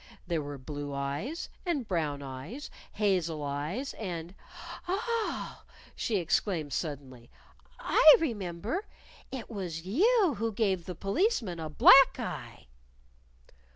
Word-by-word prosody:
There 170 -3 -1
were 145 -1 -6
blue 145 +1 -6
eyes 145 - -3 0.2
and 295 - -1
brown 150 -6 -1
eyes, 140 - -7 0.2
hazel 180 -7 0
eyes 150 - -3
and 175 -4 -5 0.5
"Ah!" 445 +4 -2 0.3
she 225 - -1
exclaimed 165 -4 0
suddenly. 130 -6 -5 0.5
"I 310 - +8
remember! 220 - -3 0.4
It 265 -3 -6
was 180 -6 -5
you 380 - +3
who 225 0 -1
gave 195 -5 0
the 180 - -5
Policeman 205 - 0
a 160 -1 -4
black 270 - +7
eye!" - - -6
185 Hz, 115 wpm, -30 LUFS, -, 0.5 s, I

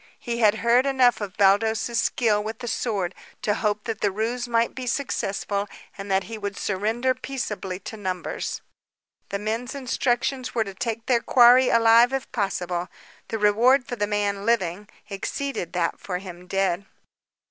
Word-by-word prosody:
He 235 -1 -4
had 215 -2 +5
heard 245 +3 +4
enough 255 -4 +3
of 205 -1 -6
Baldos's 220 +4 +3
skill 210 -4 +1
with 220 +1 -5
the 240 - -7
sword 200 -7 -1 0.3
to 210 - +2
hope 210 -1 -1
that 225 -2 -4
the 205 - +2
ruse 230 +5 -2
might 230 -1 +1
be 255 -1 -6
successful 205 -5 -2 0.3
and 200 0 -8
that 190 0 +2
he 225 +1 -7
would 200 -1 -4
surrender 220 +6 0
peaceably 235 -8 -4
to 220 - -8
numbers. 185 -3 -4 0.7
The 200 - -2
men's 225 +5 -3
instructions 255 0 -1
were 225 - +2
to 195 -2 -8
take 225 +3 -4
their 245 -3 +2
quarry 250 +1 +6
alive 230 +2 +5
if 270 -1 -3
possible. 180 -5 -2 0.4
The 225 - -3
reward 235 +6 +4
for 245 - -5
the 205 -3 -1
man, 205 -1 -1
living, 205 -3 0 0.2
exceeded 200 0 -4
that 175 -2 -1
for 180 -2 -4
him 180 -1 -10
dead. 195 0 0
220 Hz, 165 wpm, -24 LUFS, 200-240 Hz, 0.7 s, quarry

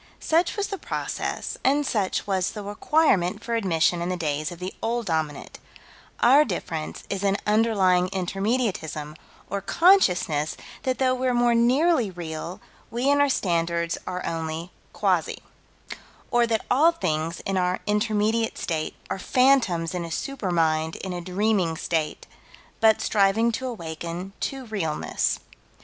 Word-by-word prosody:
Such 335 +5 +1
was 405 -1 -1
the 395 - -4
process, - - -4
and 285 +2 +3
such 205 -7 0
was 190 -2 0
the 210 - -6
requirement 205 - +1
for 235 - -3
admission 175 -5 +2
in 175 - -2
the 185 - -1
days 155 -1 -2
of 175 - -8
the 185 +2 -5
Old 235 +1 -1
Dominant: 155 -5 -3 0.6
our 270 +5 +7
difference 165 - -4
is 195 0 -3
in 200 0 +2
underlying 200 -5 +3
Intermediatism, 190 -6 -2 0.3
or 200 +1 -3
consciousness 185 - +3 0.2
that 260 -1 -1
though 260 -1 +2
we're 255 -1 0
more 240 0 +3
nearly 250 - +3
real, 170 -1 -6 0.3
we 245 +4 +1
and 285 0 +4
our 285 - +4
standards 170 -5 0
are 180 0 -4
only 165 +1 -4 0.2
quasi - - 0 0.9
Or 240 -1 +3
that 225 -1 -1
all 300 +7 +5
things 160 - -2
in 195 - -2
our 180 0 +1
intermediate 215 +1 +1
state 160 -2 -3 0.2
are - - -2
phantoms 230 -10 +2
in 180 -1 -2
a 170 - -6
super 235 - -3
mind 160 -2 +1
in 190 -1 -5
a 175 - -4
dreaming 185 -2 0
state 160 -3 -2 0.5
but 220 -1 +4
striving 210 +3 +3
to 260 +3 -3
awaken 170 -3 -6
to 270 -1 -3
realness. 190 -9 -1
195 Hz, 145 wpm, -25 LUFS, 170-240 Hz, 0.9 s, our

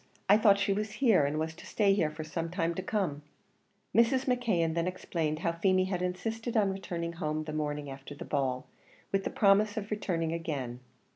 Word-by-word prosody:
I 200 - +7
thought 210 -2 +5
she 200 0 +1
was 210 +1 -3
here, 215 - +4
and 150 +2 -2
was 160 +1 -2
to 160 - -13
stay 200 -2 +3
here 170 -6 +2
for 155 +1 -7
some 165 +2 -3
time 170 -1 -1
to 185 - -3
come." 185 -7 -1 0.7
Mrs. 235 +4 +4
McKeon 220 -11 +1
then 170 +1 0
explained 165 -4 -2
how 170 - +3
Feemy 185 +2 +2
had 185 -2 -2
insisted 225 +6 -2
on 200 -3 +3
returning 170 -3 -4
home 155 -2 -2
the 155 0 -6
morning 150 -1 -2
after 135 +1 -8
the - - -8
ball, 130 -3 -1 0.5
with 195 0 0
the - - 0
promise 205 +1 +3
of 210 0 -4
returning 170 -6 -1
again. 140 -7 -4
175 Hz, 200 wpm, -30 LUFS, 155-205 Hz, 0.7 s, I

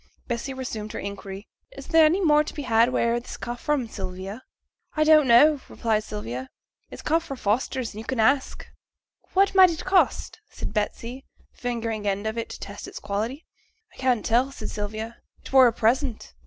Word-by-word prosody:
Bessy 240 +3 -3
resumed 230 -5 -5
her - - -4
inquiry. 200 0 -7 0.3
'Is - - -8
there 325 -1 +6
any 345 +6 +3
more 300 -1 +5
to - - -8
be 290 - -4
had 230 -1 +4
wheere 235 -2 +1
that 240 - -9
come 240 0 -4
fra', 270 0 -1
Sylvia?' 195 +2 -6 0.6
'I 310 - +4
don't 310 -2 +6
know,' 275 +5 +6
replied 220 -2 0
Sylvia. 130 - -6 0.4
'It - - -10
come 325 +2 +2
fra' 275 -5 -7
Foster's, 240 +2 -1
and 215 - -7
yo' 225 - -13
can 260 -3 -2
ask.' 265 +4 +2 0.7
'What 390 +1 +3
might 375 -1 +8
it 330 0 -5
cost?' 380 +3 +1
said - - -6
Betsy, 230 +4 -3 0.3
fingering 230 -4 -3
an 195 -1 +1
end 205 - -9
of 220 +1 -2
it 230 -1 -4
to - - -8
test - - -8
its - - -9
quality. 225 +9 -3 0.5
'I - - -20
can't 255 -4 +1
tell,' 250 +4 +2
said 220 -5 -6
Sylvia, 215 +2 -5 0.2
'it - - -12
were 260 -2 +8
a - - +3
present.' 235 - 0
235 Hz, 195 wpm, -25 LUFS, 215-275 Hz, 0.7 s, might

